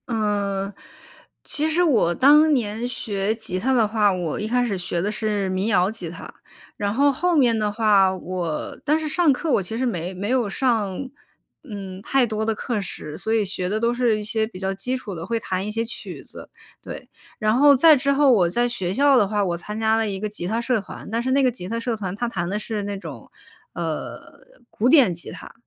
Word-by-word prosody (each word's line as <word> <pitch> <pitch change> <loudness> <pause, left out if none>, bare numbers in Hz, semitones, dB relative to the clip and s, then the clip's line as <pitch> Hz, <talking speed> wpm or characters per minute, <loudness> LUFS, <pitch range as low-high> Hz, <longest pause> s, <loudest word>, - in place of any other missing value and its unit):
嗯， 205 -3 -1 0.7
其 305 +1 +1
实 340 +3 +2
我 230 - +3
当 300 +4 +6
年 230 -2 -1
学 205 -3 -2
吉 220 -5 -2
他 265 +7 +1
的 230 -4 +3
话， 210 -1 +2
我 175 -4 -3
一 210 - -3
开 245 +2 +1
始 205 -5 -2
学 175 -1 -2
的 205 +4 -1
是 210 -3 -1
民 185 +2 -1
谣 190 -4 +3
吉 190 -7 -7
他。 170 - -10 0.4
然 205 -1 -1
后 280 +4 +4
后 350 +6 0
面 245 -6 +4
的 210 -1 0
话， 205 -3 +3
我 180 -4 -4
但 305 +2 +2
是 315 - -3
上 320 0 +3
课， 295 +4 -1
我 225 - +3
其 205 +5 -4
实 260 - 0
没 180 -6 -3
没 200 +3 -3
有 250 -4 +1
上， 215 -5 0 0.6
嗯， 195 -7 -8
太 265 +4 +2
多 215 -1 -3
的 220 0 0
课 225 -2 -2
时， 155 -5 -7
所 220 - -4
以 220 -2 +2
学 185 -2 -2
的 215 +2 -1
都 235 +1 +1
是 240 -3 +1
一 - - -5
些 220 +1 -1
比 220 - -11
较 190 +1 -2
基 250 +7 -2
础 215 -6 -7
的， 165 -2 -6
会 230 -1 -1
弹 190 -2 -3
一 - - -3
些 225 +2 -2
曲 235 - -8
子， - - -12 0.3
对。 - - -9 0.3
然 215 0 +1
后 285 +2 +6
再 310 +4 +7
之 280 +1 +1
后 280 -1 +4
我 185 -8 +4
在 240 +7 +1
学 190 -7 -3
校 280 +4 +4
的 215 -6 +4
话， 205 0 0
我 175 -2 -1
参 210 +5 -6
加 220 0 +2
了 225 -1 0
一 195 -1 -4
个 215 - -2
吉 205 -4 -6
他 220 +4 -1
社 235 -2 0
团。 195 - -10
但 230 +1 0
是 255 - -2
那 275 +1 +3
个 255 - +3
吉 200 -7 -8
他 230 +1 -2
社 230 0 -2
团， 195 -4 -5
它 240 +3 -2
弹 175 -7 -3
的 205 - -1
是 215 0 -4
那 200 0 -4
种， 150 - -10 0.4
呃， 165 -3 -6 0.3
古 235 +4 +1
典 260 - +6
吉 170 - -7
他， - - -11
215 Hz, 250 characters per minute, -23 LUFS, 195-245 Hz, 0.7 s, 再